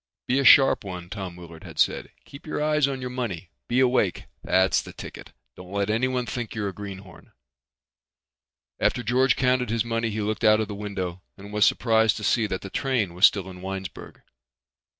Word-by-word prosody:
"Be 130 +2 +2
a - - +1
sharp 135 -2 +6
one," 90 -2 -8
Tom 95 -4 -6
Willard 85 -2 -12
had - - -11
said. - - +1 0.2
"Keep 140 +3 -13
your 155 - -3
eyes 150 -1 +2
on 135 -2 -4
your 125 0 -5
money. 100 -10 -5 0.2
Be 120 - +1
awake. 125 -8 +2 0.2
That's 95 0 +3
the - - -11
ticket. - - -10 0.2
Don't 90 0 -12
let 100 +1 0
anyone 125 +2 0
think 120 -1 -5
you're 105 -2 -2
a - - -8
greenhorn." 95 -2 -10 1.5
After 125 - +1
George 125 +2 +3
counted 125 -2 +1
his 115 0 0
money 115 0 -1
he 110 0 -3
looked 105 +2 -2
out 110 0 +5
of 110 - -1
the 105 - -6
window 95 -3 -5 0.2
and 100 +2 -11
was 105 -1 +4
surprised 110 -2 +2
to 105 - -7
see 110 +1 +2
that 95 -2 -4
the 95 - -9
train 120 -10 -1
was 90 +3 +7
still 95 -2 -3
in 90 -1 -10
Winesburg. 95 -3 -7
105 Hz, 195 wpm, -25 LUFS, 95-125 Hz, 1.5 s, was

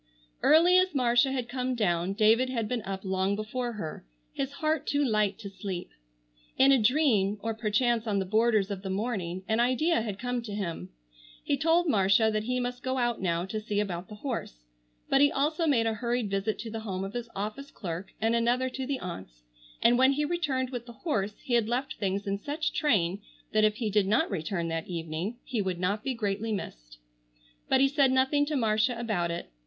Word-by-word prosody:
Early 345 +4 +6
as 370 -3 +1
Marcia 245 0 +3
had 255 -3 -2
come 255 0 -2
down, 180 -4 0
David 225 +4 +4
had 230 -4 -1
been 245 0 -2
up 195 0 -6
long 190 +1 0
before 235 +3 -3
her, 165 -8 -6 0.3
his 275 0 -3
heart 310 +1 -1
too 285 0 +2
light 215 -4 +1
to 215 -3 -8
sleep. 190 -3 -6 0.7
In 270 +1 +6
a 265 -3 +5
dream, 215 -5 +3
or 225 0 -1
perchance 225 +1 +1
on 205 -2 +1
the 190 - 0
borders 215 0 +2
of 195 -2 -4
the 190 - -5
morning, 190 -3 -2
an 220 +1 +1
idea 255 +6 +2
had 210 -3 -4
come 245 +1 -2
to 220 -3 -7
him. 170 - -4 0.5
He - - +1
told 335 +2 +2
Marcia 205 -2 +4
that 215 0 -1
he 250 +1 0
must 245 0 -3
go 260 0 -2
out 240 -4 0
now 170 -1 0
to 215 +3 -4
see 210 -1 -2
about 185 -3 -3
the 210 - -8
horse, 210 - -5 0.4
but 270 - +3
he 285 0 +5
also 310 +4 0
made 240 -6 +3
a 225 - +1
hurried 235 -1 -2
visit 200 +2 -1
to 225 - -7
the 225 - -4
home 190 -4 -4
of 195 +1 -5
his 240 -1 -5
office 215 +8 -4
clerk 185 -1 -6
and 225 +1 +2
another 240 +2 +1
to 260 0 -4
the 275 -2 -2
aunts, 95 - -8 0.4
and 240 +1 +5
when 260 +1 +5
he 295 +2 0
returned 290 -6 -1
with 245 -2 -5
the 235 - -9
horse 210 - 0
he 260 - -3
had 230 -2 +3
left 255 +3 -2
things 200 0 -1
in 200 0 -2
such 295 +7 -2
train 200 - +1 0.3
that 215 0 +3
if 215 -1 +3
he 220 -2 -2
did 205 -1 +2
not 215 +2 +2
return 170 -1 -2
that 165 0 -3
evening 170 +5 -4
he 230 -4 -1
would 185 -3 -2
not 200 +4 -1
be 265 -2 -2
greatly 210 0 -2
missed. - - -6 0.7
But 265 - +4
he 275 - +6
said 275 -1 +3
nothing 265 +3 +2
to 305 - -1
Marcia 230 0 +1
about 205 -8 -1
it. 170 - -5
225 Hz, 210 wpm, -28 LUFS, 195-255 Hz, 0.7 s, Early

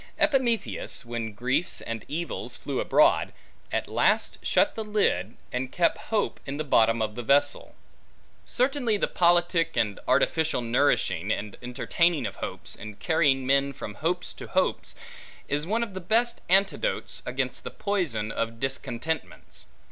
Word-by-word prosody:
Epimetheus, 250 - +1
when 115 -1 -4
griefs 125 - 0
and 115 -1 -5
evils 170 +3 -3
flew - - -3
abroad, - - +4 0.4
at - - -1
last - - +1
shut 295 0 +2
the 220 - -4
lid, 200 - 0 0.2
and 125 +1 -2
kept 170 -1 +2
hope 215 -2 0
in 140 +1 -3
the 155 - -1
bottom 115 -5 +3
of 105 -1 -2
the 120 - -5
vessel. 140 +4 +2 0.7
Certainly, 250 -3 +1
the - - +1
politic 175 -1 +2
and 105 -2 +1
artificial 160 +4 +2
nourishing, 115 - +1
and 105 -1 -3
entertaining 155 +6 +1
of - - -5
hopes, - - -5
and 105 -1 -9
carrying 145 -6 +2
men 140 +1 +2
from 105 - -7
hopes 170 +10 -2
to - - -9
hopes, - - 0 0.5
is 145 +3 -1
one 225 +4 +1
of 215 -4 -6
the 190 - -5
best 230 +6 +1
antidotes 195 - +1
against - - -3
the - - -4
poison 150 - -1
of 115 0 -3
discontentments. 135 +3 -4
145 Hz, 150 wpm, -27 LUFS, 115-190 Hz, 0.7 s, abroad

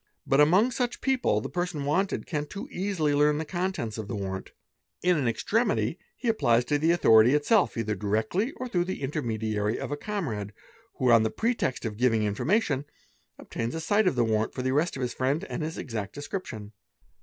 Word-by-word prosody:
But 135 +2 +4
among 185 +11 +5
such 245 0 -2
people, 265 -2 +1
the - - -5
person 175 -5 -2
wanted 190 +7 0
can 150 -4 -2
but - - -25
too 205 +6 -6
easily 180 - 0
learn 150 +1 +3
the 160 - -3
contents 175 - -3
of 105 - -5
the 115 - -4
warrant. 95 -1 -4 0.5
In 180 0 +4
5; - - +1
F - - 0
n 125 - 0
extremity 205 - 0 0.2
he 245 - -5
applies 120 - +3
to 145 +3 +1
the 160 +2 +2
authority 120 -7 +6
itself 180 - +2
either 110 -2 -1
directly 110 - -1
or 255 - -5
through 175 -7 0
the 185 -6 -5
intermediary 110 -6 -1
of - - -5
a - - 0
comrade, 130 - -4 0.4
who, 130 -3 +2
on 115 -1 +7
the 110 - +1
pretext 225 - -1
of 105 -2 -4
giving 115 -3 +2
information, 145 - +1
_ - - -32 0.5
obtains 115 +4 -4
a - - -2
sight 205 +5 +2
of 160 - +2
the 120 -1 +2
warrant 110 0 0
for 130 - -3
the 130 - 0
arrest 150 +6 +1
of 135 - -3
his 125 -1 -2
friend 140 +7 0
and - - -3
his 160 +1 -4
exact 110 -6 -5
d - - -7
escription. 130 - -6
145 Hz, 215 wpm, -27 LUFS, 115-185 Hz, 0.5 s, on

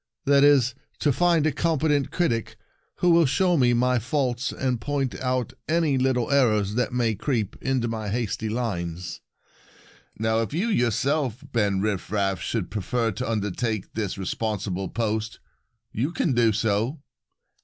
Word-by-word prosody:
That 140 0 +5
is, 135 -3 +5 0.2
to 145 - +2
find 170 0 +3
a 155 - +3
competent 150 -2 +1
critic 120 -11 -1 0.5
who 180 - +5
will 165 -2 +5
show 180 +6 +2
me 125 -5 +3
my 125 +1 +2
faults 125 0 -1
and 125 -3 -2
point 140 -3 -1
out 130 -2 -1 0.2
any 160 -3 +2
little 130 -1 +1
errors 110 -7 +3
that 125 +2 0
may 120 -2 +1
creep 110 -1 -2
into 130 -3 0
my 110 -2 -3
hasty 110 0 -2
lines. 90 -7 -3 1.0
Now, 110 +1 +1
if 115 - -4
you 200 +8 0
your 120 - +2
self, 135 +1 -1
Ben 100 -4 +1
Rifraf, 100 -2 -1
should 110 -2 -3
prefer 115 +3 -1
to 105 +2 -4
undertake 110 0 -2
this 105 -4 -3
responsible 95 -1 -3
post, 110 -1 -2 0.5
you 125 +8 -1
can 165 -4 0
do 120 -2 +4
so." 110 +6 0
120 Hz, 150 wpm, -25 LUFS, 110-140 Hz, 1.0 s, That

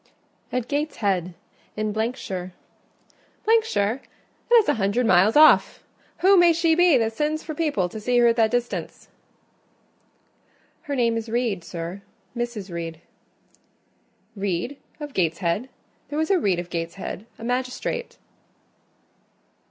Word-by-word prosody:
"At 250 -1 -2
Gateshead; 200 - -1 0.4
in 215 -1 -1
——shire." 205 -5 -3 0.5
" 450 0 0
shire? 225 - -1 0.5
That 480 - +6
is 450 -3 +6
a 295 - +3
hundred 225 +2 0
miles 195 +1 +4
off! 310 +1 +6 0.4
Who 385 +2 +6
may 350 -1 +6
she 330 0 +2
be 350 -3 +5
that 225 -1 0
sends 305 +5 -1
for 310 - -5
people 290 - 0
to 215 - -8
see 245 +3 0
her 235 -1 +5
that 225 -1 +3
distance?" 245 0 -3 1.7
"Her 285 - -4
name 235 -3 +1
is 225 0 -5
Reed, 225 -6 -1
sir—Mrs. 200 +5 -7
Reed." 165 -1 -5 1.4
"Reed 200 +6 -2 0.2
of 295 -2 -7
Gateshead? 175 +6 0 0.4
There 295 - -4
was 315 +4 0
a 380 - +4
Reed 195 - +1
of 175 0 -6
Gateshead, 170 +5 -5
a - - -11
magistrate." 255 - -3
230 Hz, 130 wpm, -24 LUFS, 195-295 Hz, 1.7 s, That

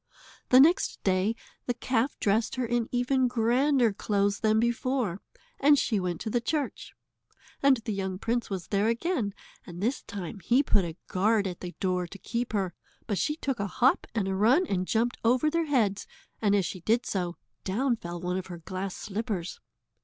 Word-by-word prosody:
The 255 - +7
next 325 +7 +4
day 190 +3 +2 0.3
the 245 - 0
calf 255 +2 -1
dressed 220 +2 +1
her 255 -1 -1
in 235 0 0
even 255 +1 +2
grander 245 +1 +2
clothes 200 0 0
than 220 0 +3
before, 235 -4 0 0.4
and 290 +1 +6
she 220 -6 +1
went 180 -3 -2
to 220 - -3
the 240 - +1
church. 290 +2 -3 0.7
And 275 -1 +5
the 220 - -1
young 190 -1 -3
prince 235 +4 -1
was 185 -4 -5
there 205 +1 +2
again, 235 - -1 0.3
and 175 -1 -9
this 235 +8 0
time 200 0 -7
he 245 - +3
put 200 -8 +2
a 165 0 -6
guard 205 +2 +2
at 180 -2 -4
the 180 -1 -7
door 180 -2 0
to 195 - -10
keep 235 +4 -3
her, 190 -4 0 0.3
but 205 -4 -1
she 300 - 0
took 270 -6 -3
a 200 - -1
hop 250 +7 +2
and 205 -4 0
a 190 - -1
run 240 - +4
and 185 - -1
jumped 235 +2 +1
over 250 +6 +3
their 335 0 +1
heads, 220 -9 +1 0.3
and 205 -2 +3
as 195 -3 +2
she 185 - -5
did 225 +7 +1
so, 175 -3 -2 0.3
down 240 +6 +1
fell 175 -5 -7
one 180 +1 -2
of 185 - -8
her 175 -2 -7
glass 185 +3 -5
slippers. 205 -4 -4
220 Hz, 190 wpm, -28 LUFS, 190-245 Hz, 0.7 s, The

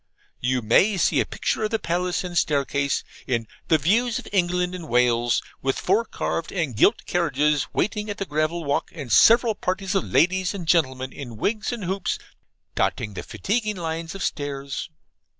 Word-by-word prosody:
You 125 0 0
may 190 - +4
see - - +3
a - - +1
picture - - -2
of - - -1
the 225 - +1
palace 180 -1 -1
and 180 -1 -6
staircase, 140 -3 +1 0.2
in 120 -3 0 0.2
the 160 - +5
'Views 225 - +2
of 250 - -7
England 180 -1 +1
and 175 -4 -7
Wales,' 120 -1 +2 0.2
with 135 0 0
four 210 +5 +2
carved 165 - -3
and 160 - -2
gilt 210 - +3
carriages 150 -4 +1
waiting 210 0 -1
at 205 - -4
the 195 - -3
gravel 155 +2 -1
walk, 140 -1 -1
and 140 -8 -6
several 230 - +6
parties 190 0 -2
of 195 - +1
ladies 185 +3 +2
and 175 -4 -6
gentlemen 130 -6 +1
in 120 -6 -8
wigs 215 - -1
and 235 -4 -5
hoops, 190 +1 -1 0.6
dotting 105 - -1
the - - -5
fatiguing 215 0 -2
lines 165 0 -4
of 195 - -4
stairs. 140 0 -3
170 Hz, 175 wpm, -24 LUFS, 140-195 Hz, 0.6 s, several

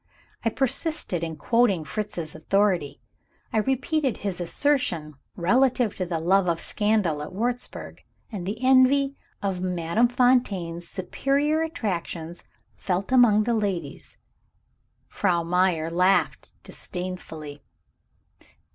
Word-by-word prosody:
I 230 - +2
persisted 265 - -2
in 165 -1 -3
quoting 210 0 +2
Fritz's 175 -7 -4
authority; 175 -3 0 0.5
I 220 - +3
repeated 265 +2 0
his 190 -3 -4
assertion 175 - 0 0.2
relative 240 +4 +2
to 185 - -2
the 165 -2 -2
love 180 +2 +3
of 165 -1 0
scandal 205 -8 0
at 150 - -6
Wurzburg, 240 +5 -3 0.3
and 190 -5 -5
the 220 +5 -4
envy 265 +2 +4 0.3
of 190 -2 -1
Madame 180 +5 +1
Fontaine's 205 -9 +1
superior 280 - 0
attractions 180 - -4 0.3
felt 190 +4 -2
among 235 -5 +5
the 235 +2 0
ladies. 200 -6 -3 0.9
Frau 175 -4 0
Meyer 170 -2 +1
laughed 180 +3 +1
disdainfully. 160 -5 -6
195 Hz, 110 wpm, -25 LUFS, 170-245 Hz, 0.9 s, among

